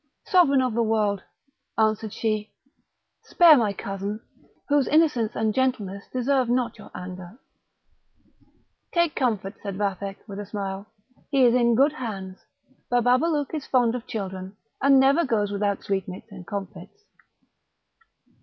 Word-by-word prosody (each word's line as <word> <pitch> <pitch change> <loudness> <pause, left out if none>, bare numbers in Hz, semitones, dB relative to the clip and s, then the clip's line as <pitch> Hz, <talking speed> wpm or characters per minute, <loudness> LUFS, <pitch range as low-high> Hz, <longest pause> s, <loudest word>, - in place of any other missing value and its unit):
"Sovereign 310 -10 +4
of 250 -3 -1
the 235 - +1
world?" 215 -3 +1 0.6
answered 220 -1 +1
she, 215 -1 -2 0.7
"spare 335 -3 +6
my 225 -6 +2
cousin, 200 +1 -5 0.5
whose 285 -2 +2
innocence 295 -8 +2
and 220 -1 0
gentleness 210 -7 -1
deserve 255 0 +1
not 240 -2 0
your - - -12
anger." 180 +2 -8 1.6
"Take 340 -2 +2
comfort," 215 -6 -1
said 200 -2 -5
Vathek, 195 -1 -3
with 200 -1 -7
a 205 - -5
smile; 195 0 -5 0.4
"he 275 -3 +4
is 235 - +5
in 235 -2 +3
good 280 +5 +4
hands. 195 -9 -6 0.5
Bababalouk 255 +6 +2
is 305 -3 -4
fond 245 -3 +2
of 250 0 -6
children, 190 -2 -6 0.2
and 275 0 +6
never 275 +5 +4
goes 210 -6 0
without 200 -1 -1
sweetmeats 195 +2 -4
and 185 -3 -11
comfits." 195 - -7
220 Hz, 135 wpm, -25 LUFS, 200-260 Hz, 1.6 s, spare